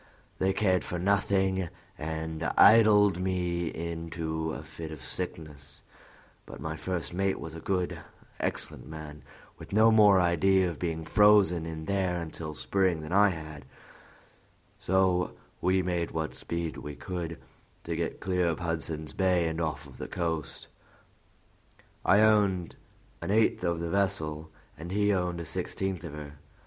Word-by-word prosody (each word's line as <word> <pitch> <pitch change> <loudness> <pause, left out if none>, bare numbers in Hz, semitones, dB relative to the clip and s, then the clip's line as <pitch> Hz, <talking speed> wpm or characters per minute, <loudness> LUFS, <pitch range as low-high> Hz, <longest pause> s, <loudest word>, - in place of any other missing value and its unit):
They 95 0 +2
cared 95 -2 +2
for 90 - -4
nothing, 95 -1 +1 0.3
and 80 +1 -4
idled 105 -4 +7
me 90 -2 -1
into 80 -1 -4
a - - -6
fit 80 -1 -8
of 75 - -8
sickness; 75 -3 -7 0.6
but - - -10
my 80 0 -4
first 85 -3 -4
mate 95 +1 0
was 80 - -7
a 85 - -7
good, 90 +1 -1 0.4
excellent - - -3
man, 75 -1 -9 0.4
with - - -11
no 110 +2 +5
more 105 -3 +6
idea 90 +2 +3
of 85 - -5
being 80 -2 -2
frozen 95 -3 +4
in 80 -1 -6
there 95 -1 0
until 80 -2 -6
spring 85 +6 +1
than 75 +1 -8
I 100 +2 +5
had, 80 -5 -7 1.2
so 95 -1 +1 0.3
we 95 +1 +2
made 85 -1 -1
what 80 -1 -3
speed 85 -3 -4
we 70 +2 -7
could 85 -2 -5 0.5
to 85 - -3
get 85 0 -3
clear 90 -2 0
of 80 -2 0
Hudson's 80 -2 -3
Bay 90 -3 +2
and 80 +1 -2
off 80 -2 -2
the - - -5
coast. 80 -4 -3 1.4
I 100 +2 +5
owned 100 -5 +3 0.5
an - - -4
eighth 110 -2 +2
of 85 -2 0
the 85 0 -3
vessel, 80 -6 0 0.3
and 85 +2 -7
he 105 +1 +2
owned 90 -2 -1
a 85 - -5
sixteenth 95 +2 -2
of 85 -4 -7
her. 75 -1 -9
85 Hz, 150 wpm, -29 LUFS, 80-95 Hz, 1.4 s, idled